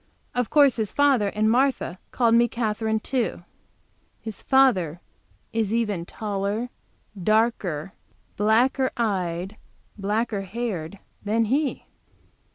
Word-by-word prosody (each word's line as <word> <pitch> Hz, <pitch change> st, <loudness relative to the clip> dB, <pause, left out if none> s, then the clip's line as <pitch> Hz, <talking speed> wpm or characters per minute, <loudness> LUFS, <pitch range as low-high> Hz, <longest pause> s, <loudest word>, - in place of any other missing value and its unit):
Of 245 Hz, -2 st, -1 dB
course 285 Hz, -5 st, +5 dB
his 215 Hz, -3 st, -1 dB
father 275 Hz, -7 st, +3 dB
and 210 Hz, +2 st, 0 dB
Martha 245 Hz, -6 st, +1 dB
called 235 Hz, -2 st, +2 dB
me 235 Hz, +1 st, +5 dB
Katherine, 220 Hz, -1 st, -1 dB
too. 245 Hz, -9 st, -2 dB, 0.8 s
His 220 Hz, -3 st, -7 dB
father 195 Hz, -, +3 dB, 0.5 s
is 220 Hz, -3 st, 0 dB
even 205 Hz, -7 st, -1 dB
taller, 210 Hz, +3 st, -3 dB, 0.5 s
darker, 200 Hz, -6 st, +1 dB, 0.4 s
blacker 245 Hz, +5 st, +3 dB
eyed, 190 Hz, -3 st, -2 dB, 0.4 s
blacker 210 Hz, +1 st, -1 dB
haired 195 Hz, -4 st, -4 dB, 0.3 s
than 220 Hz, +2 st, +1 dB
he. 275 Hz, +5 st, 0 dB
220 Hz, 105 wpm, -24 LUFS, 200-240 Hz, 0.8 s, course